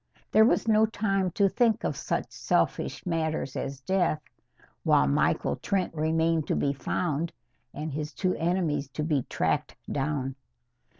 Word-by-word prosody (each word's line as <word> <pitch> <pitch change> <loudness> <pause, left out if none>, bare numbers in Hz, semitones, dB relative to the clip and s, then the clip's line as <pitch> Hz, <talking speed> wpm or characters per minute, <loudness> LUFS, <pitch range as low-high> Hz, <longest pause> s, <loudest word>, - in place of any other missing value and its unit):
There 220 0 +7
was 230 - +2
no 220 0 +5
time 195 -4 0
to 200 -2 +4
think 225 +3 +2
of - - -1
such - - -2
selfish - - 0
matters 160 -5 -1
as 135 -1 -4
death, 175 0 +1 0.6
while 70 - +4
Michael 70 0 +1
Trent 190 -4 -1
remained 160 0 +1
to - - +1
be 140 - +1
found 160 +3 -1 0.4
and 150 0 -5
his 150 +1 -3
two 185 +5 0
enemies 165 -5 0
to 150 - -2
be 150 -3 +1
tracked - - 0 0.2
down. 135 -1 -2
160 Hz, 145 wpm, -28 LUFS, 145-190 Hz, 0.6 s, There